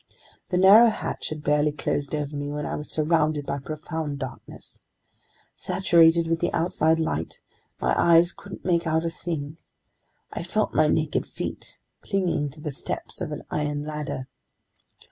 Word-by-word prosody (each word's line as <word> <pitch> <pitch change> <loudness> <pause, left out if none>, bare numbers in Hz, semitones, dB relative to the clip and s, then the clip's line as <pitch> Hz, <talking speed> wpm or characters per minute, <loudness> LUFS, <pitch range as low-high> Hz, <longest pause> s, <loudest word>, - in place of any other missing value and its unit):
The 180 - +1
narrow 200 +6 +8
hatch 215 - -4
had 155 -1 -6
barely 150 +1 +2
closed 145 0 -2
over 150 0 -3
me 145 0 -3
when 150 0 -3
I - - -3
was 150 - -6
surrounded 155 -2 +1
by 140 - -2
profound 155 0 -5
darkness. 130 -2 -9 0.7
Saturated 170 -3 +4
with 165 0 0
the 175 - 0
outside 160 -1 +2
light, 80 - -2 0.4
my 60 0 +1
eyes 170 +1 +5
couldn't 200 - -11
make 170 -2 +1
out 160 +1 +1
a 165 - -1
thing. 155 -3 -5 0.8
I - - -4
felt - - -1
my - - +4
naked - - 0
feet - - -6 0.2
clinging 180 -7 0
to 150 +3 -14
the 150 - -3
steps - - -5
of - - -3
an - - -5
iron 145 -1 -1
ladder. 150 -4 -4
155 Hz, 160 wpm, -25 LUFS, 145-170 Hz, 0.8 s, narrow